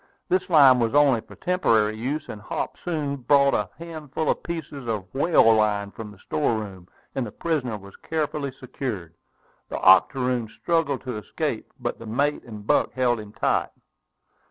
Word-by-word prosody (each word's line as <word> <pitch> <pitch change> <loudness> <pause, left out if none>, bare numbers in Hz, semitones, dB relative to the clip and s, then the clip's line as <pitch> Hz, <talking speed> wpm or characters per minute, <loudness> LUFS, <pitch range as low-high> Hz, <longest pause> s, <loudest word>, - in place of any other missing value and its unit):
This 185 +1 +1
line 140 -6 +7
was 115 +2 0
only 140 -6 +5
for - - -15
temporary 110 -12 +2
use; 135 +8 -3
and 105 - -8
Hop - - -4
soon 150 -5 -2
brought 140 +1 +4
a 105 -2 0
handful 160 -3 -3
of - - -3
pieces 150 -6 -6
of 105 -4 -2
whale 135 -5 +5
line 105 -2 +1
from 110 0 -8
the 105 - -14
store 120 +2 0
room, 95 -4 -7 0.3
and 135 - -1
the 110 - -6
prisoner 135 -9 -2
was 100 -1 -14
carefully 150 -3 -2
secured. 125 -9 -6 0.6
The - - -3
octoroon 120 +5 +4
struggled 165 -5 0
to 125 -4 -4
escape, 105 - -4
but - - -3
the 115 - -9
mate 140 +7 0
and 105 -4 -9
Buck - - +2
held 120 -2 +1
him 105 -1 -9
tight. 115 - +1
125 Hz, 170 wpm, -24 LUFS, 110-145 Hz, 0.6 s, line